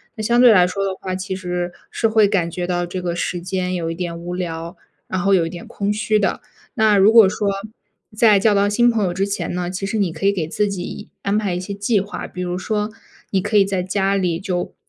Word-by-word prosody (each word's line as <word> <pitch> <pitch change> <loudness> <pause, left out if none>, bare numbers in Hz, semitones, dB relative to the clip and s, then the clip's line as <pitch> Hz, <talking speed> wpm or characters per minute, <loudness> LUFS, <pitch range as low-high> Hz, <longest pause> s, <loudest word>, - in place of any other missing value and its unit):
那 220 - -5
相 235 +3 +2
对 245 -1 +8
来 180 -4 +5
说 195 +2 -3
的 195 - -1
话， 185 -1 -3
其 190 0 -4
实 180 -1 -3 0.2
是 225 - 0
会 220 -1 +4
感 180 -4 0
觉 175 +1 -3
到 175 -1 -1
这 180 +1 -5
个 175 -1 -2
时 175 0 -2
间 185 0 -2
有 170 -2 -2
一 165 - -4
点 170 -1 -4
无 175 +1 -5
聊， 170 -1 -5 0.3
然 185 - -2
后 195 +2 +2
有 170 -4 +3
一 - - -5
点 175 0 -9
空 200 0 -2
虚 215 0 +1
的。 195 -3 0 0.3
那 220 -1 +4
如 200 +2 +6
果 225 -3 +8
说， 200 +1 -1 0.7
在 215 -2 +5
交 210 +2 +3
到 200 0 +3
新 240 +3 +4
朋 220 -3 0
友 180 - 0
之 190 +3 0
前 200 -4 -3
呢， 180 0 -2
其 190 +1 -4
实 220 +2 -2
你 195 -5 +1
可 160 +4 -1
以 - - +5
给 175 -6 -2
自 205 +5 0
己 185 -3 -6
安 200 +1 0
排 205 -4 0
一 - - -2
些 185 +2 -5
计 205 +2 +1
划。 200 +2 -5
比 180 - -6
如 180 0 -3
说 210 +2 -2 0.4
你 190 - +1
可 210 +2 +1
以 200 - +6
在 195 -2 -1
家 195 +1 0
里 180 -4 0
就， 180 -2 -3
190 Hz, 275 characters per minute, -20 LUFS, 180-205 Hz, 0.7 s, 对